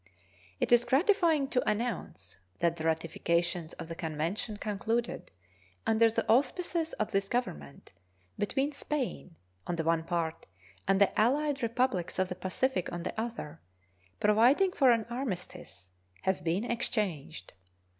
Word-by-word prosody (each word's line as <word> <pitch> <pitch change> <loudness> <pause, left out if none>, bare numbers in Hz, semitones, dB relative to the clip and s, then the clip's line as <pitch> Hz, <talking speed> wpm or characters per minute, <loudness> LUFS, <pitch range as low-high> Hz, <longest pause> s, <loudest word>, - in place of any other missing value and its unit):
It - - 0
is 240 0 +7
gratifying 320 - +3
to 250 - +1
announce 210 - -3 0.2
that 170 +5 +1
the 160 - -4
ratifications 165 +1 0
of - - -8
the 165 - -5
convention 165 +6 -3
concluded 225 +3 -2 0.6
under 225 +1 +4
the 220 - -1
auspices 320 +7 +1
of 215 - -2
this 195 0 0
Government 75 - -4 0.5
between 270 +8 0
Spain 280 - -4 0.3
on 175 - -1
the 165 - -1
one 165 0 +2
part 165 -1 -2 0.4
and 195 0 +3
the 200 - +4
allied 280 +4 +2
Republics 230 -6 0
of 185 -1 +1
the 180 - -3
Pacific 185 +3 -1
on 175 0 -4
the - - -3
other, 225 - -5 0.6
providing 245 - +4
for 270 -7 +4
an 230 -2 +2
armistice, 195 - -6 0.3
have 190 0 0
been 175 +5 0
exchanged. 210 - -3
210 Hz, 135 wpm, -30 LUFS, 170-250 Hz, 0.6 s, is